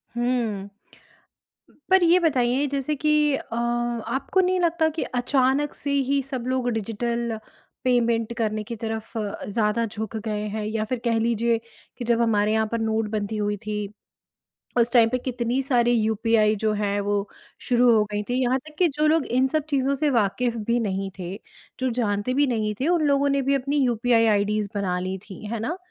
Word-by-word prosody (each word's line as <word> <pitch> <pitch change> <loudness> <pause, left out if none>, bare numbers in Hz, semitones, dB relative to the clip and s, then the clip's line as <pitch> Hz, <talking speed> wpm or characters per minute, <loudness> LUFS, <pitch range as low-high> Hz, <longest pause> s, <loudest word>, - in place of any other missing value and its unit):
हुँ। 235 -5 -1 1.2
पर 375 -1 +5
ये 345 +2 +5
बताइए 270 -4 +2
जैसे 280 +2 -1
कि 305 +2 0 0.2
अ 230 - -6 0.5
आपको 265 +9 0
नहीं 370 0 +2
लगता 335 -2 +2
कि 315 +1 -3
अचानक 265 +3 +1
से 285 - -4 0.2
ही 280 0 +2
सब 260 -2 -5
लोग 255 -1 0
डिजिटल 230 +1 -2 0.5
पेमेंट 235 -2 +1
करने 215 -2 -1
की 230 +2 -6
तरफ 225 0 -5
अ, 210 -2 -4
ज़्यादा 215 +2 +1
झुक 220 0 -5
गए 210 -1 -3
हैं 215 +1 -3
या 215 0 -1
फिर 250 +2 -3
कह 230 -1 +2
लीजिए 230 0 +1 0.4
कि 245 - -5
जब 235 0 +2
हमारे 215 -2 +2
यहाँ 220 0 +1
पर 230 - -1
नोटबंदी 220 -1 -1
हुई 205 0 -1
थी, 210 0 -5 0.8
उस 235 0 +3
टाइम 230 -2 +6
पे 255 - 0
कितनी 250 0 -1
सारी 240 -3 +2
यूपीआई 220 -1 +2
जो 215 - +3
हैं 205 -1 -1
वो 205 0 -1 0.4
शुरू 245 0 +5
हो 215 - +4
गई 210 0 -2
थीं। 250 +1 +1
यहाँ 255 +1 +2
तक 300 +3 -15
कि 360 - +5
जो 305 0 +3
लोग 315 -1 +3
इन 255 +2 +2
सब 305 +2 -1
चीज़ों 275 -1 +1
से 295 +2 +1
वाकिफ़ 235 0 +1
भी 235 +2 0
नहीं 195 -3 -2
थे, 180 +1 -5 0.4
जो 260 0 0
जानते 230 -1 -1
भी 285 +2 +3
नहीं 215 -4 0
थे, 270 - 0
उन 340 -3 +2
लोगों 280 0 +3
ने 280 0 +2
भी 275 +1 +1
अपनी 275 +2 -1
यूपीआई 235 -1 +3
आईडीज़ 210 0 +1
बना 190 -3 -1
लीं 185 +1 -3
थीं। 205 +2 -8
है 230 - -2
ना? 240 +11 -3
235 Hz, 190 wpm, -24 LUFS, 215-260 Hz, 1.2 s, टाइम